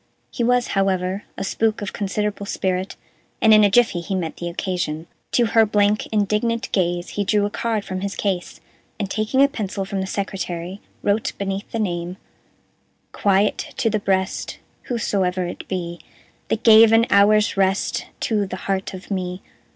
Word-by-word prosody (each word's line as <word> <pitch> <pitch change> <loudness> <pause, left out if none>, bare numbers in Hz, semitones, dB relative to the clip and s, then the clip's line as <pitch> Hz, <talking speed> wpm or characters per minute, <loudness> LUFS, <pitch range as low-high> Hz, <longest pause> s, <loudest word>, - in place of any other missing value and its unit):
He 240 - -2
was, 245 +1 +2
however, 195 0 0
a - - -3
spook 220 +2 0
of 205 - -5
considerable 205 0 -2
spirit, 185 0 -2 0.4
and 220 -2 +6
in 215 0 +7
a 205 - +5
jiffy 215 -4 +3
he 190 +3 -3
met 170 -4 -3
the 175 - -4
occasion. 170 -3 -3 0.3
To 240 - +4
her 225 0 +4
blank, 210 0 +2
indignant 220 +3 0
gaze 175 -2 0
he 205 - -2
drew 205 +1 +2
a 205 - -3
card 220 -3 -2
from 185 0 -4
his 200 0 -3
case, 190 -4 -2 0.4
and, 200 -2 -3
taking 220 +6 +2
a - - +6
pencil 205 -8 -4
from 195 0 -3
the 190 - -3
secretary, 190 -2 -4 0.2
wrote, 205 +2 +1
beneath 195 +1 -3
the - - -2
name: 175 -3 -2 0.9
Quiet 200 +1 +2 0.2
to 225 -4 +1
the 215 - +1
breast 190 -1 -1 0.3
Wheresoe'er 190 -6 0
it - - -7
be, 175 -2 -4 0.5
That 225 - -1
gave 220 0 +8
an 225 +1 +5
hour's 210 +2 +5
rest 195 0 0
To 210 -3 0
the 185 - -5
heart 195 -1 -2
of 185 +3 -11
me. 185 -1 -3
200 Hz, 170 wpm, -22 LUFS, 185-215 Hz, 0.9 s, gave